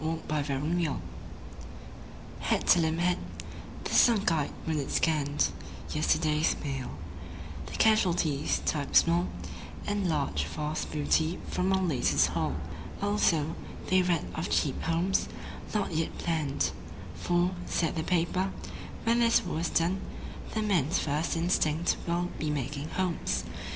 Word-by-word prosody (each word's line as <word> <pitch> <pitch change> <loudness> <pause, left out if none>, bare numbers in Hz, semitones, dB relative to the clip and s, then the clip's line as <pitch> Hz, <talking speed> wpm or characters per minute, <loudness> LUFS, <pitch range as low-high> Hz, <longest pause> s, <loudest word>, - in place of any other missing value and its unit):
Smile, 160 +1 -1
Smile, 145 -3 -1
Smile 165 -1 0 1.4
Head - - 0
to 175 - +7
limp 160 0 +1
head, 180 0 +2 0.6
the - - -3
sunk 215 -6 +5
eyed 155 -3 +1 0.2
wounded 155 -4 -1
scanned 150 -3 +2 0.4
Yesterday's 155 0 +2
Mail; 135 -3 -3 0.8
the - - -8
casualties 175 -9 +2
(typed 145 -3 -1
small) 170 +1 +5 0.6
And 205 -3 0
(large) 140 - 0
Vast 150 - -3
Booty 155 +3 +1
from 185 +1 +1
our 190 0 +2
Latest 85 - +3
Haul. 80 -4 -1 0.4
Also, 170 -7 +2 0.4
they 185 0 +6
read 175 -3 +1
of 160 - -3
Cheap 140 -4 +1
Homes, 170 +4 +1 0.4
not 205 -5 -1
yet 160 +1 -1
planned; 155 -5 0 0.4
For, 175 +1 +1 0.2
said 165 -1 0
the 160 - 0
paper, 180 +3 +1 0.5
"When 230 +1 +3
this 230 -4 +4
war 175 -3 -2
is 165 -1 0
done 180 +3 +1 0.5
The 220 - +1
men's 175 -7 +2
first 155 +3 0
instinct 165 -1 +2
will 175 +1 0
be 155 - -1
making 145 +1 -3
homes. 185 -3 -1
165 Hz, 130 wpm, -29 LUFS, 150-180 Hz, 1.4 s, to